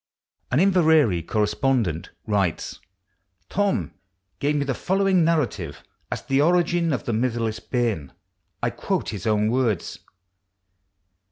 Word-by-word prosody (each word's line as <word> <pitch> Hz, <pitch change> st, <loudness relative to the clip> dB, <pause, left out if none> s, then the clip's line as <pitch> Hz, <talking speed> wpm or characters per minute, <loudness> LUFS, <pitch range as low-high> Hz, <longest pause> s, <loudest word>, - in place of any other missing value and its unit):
An 130 Hz, -, +2 dB
Inverary 160 Hz, -, +4 dB
corresponds 110 Hz, -, +1 dB
nt 80 Hz, 0 st, -5 dB, 0.2 s
writes: 100 Hz, -6 st, -1 dB, 0.3 s
" 95 Hz, 0 st, -47 dB
Thorn 200 Hz, 0 st, 0 dB, 0.5 s
gave 145 Hz, +1 st, +1 dB
me 145 Hz, -1 st, 0 dB
the 135 Hz, -, 0 dB
following 190 Hz, +2 st, +2 dB
narrative 150 Hz, -, -1 dB, 0.3 s
as -, -, -3 dB
to -, -, -30 dB
the 135 Hz, +1 st, +3 dB
origin 175 Hz, 0 st, +2 dB
of 130 Hz, -, -2 dB
'The -, -, -1 dB
Mitherless' 115 Hz, -1 st, -1 dB
Bairn'; 115 Hz, -, -2 dB, 0.5 s
I -, -, +1 dB
quote -, -, -2 dB
Ins 100 Hz, 0 st, -5 dB
own 105 Hz, 0 st, +2 dB
words. 120 Hz, -8 st, 0 dB
125 Hz, 135 wpm, -24 LUFS, 105-160 Hz, 0.5 s, Inverary